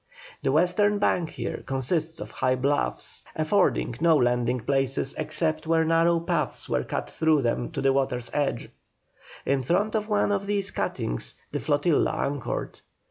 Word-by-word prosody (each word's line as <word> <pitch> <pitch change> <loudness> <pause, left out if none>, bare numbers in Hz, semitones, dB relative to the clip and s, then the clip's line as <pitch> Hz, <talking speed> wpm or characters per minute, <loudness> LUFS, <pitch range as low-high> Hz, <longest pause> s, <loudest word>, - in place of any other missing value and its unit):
The - - +1
western 180 +7 +3
bank 180 -5 +1
here - - -5
consists 155 +5 0
of - - -7
high 130 0 +1
bluffs, 130 - -1
affording 155 - +1
no 165 -1 +5
landing 120 -1 +1
places 135 +1 +1
except 155 0 -1
where 160 0 +3
narrow 165 +1 +3
paths 170 - -1
were - - 0
cut - - -3
through 155 - +2
them 120 0 -1
to 140 - -2
the 135 0 +4
water's 130 -3 -1
edge; 145 -5 -1 0.7
in 140 0 +1
front 185 - +1
of 215 -1 -1
one 205 -1 +2
of 200 -1 -1
these 200 -1 0
cuttings - - -3 0.2
the - - -2
flotilla 145 +1 +2
anchored. 140 -3 -3
155 Hz, 155 wpm, -26 LUFS, 135-170 Hz, 0.7 s, no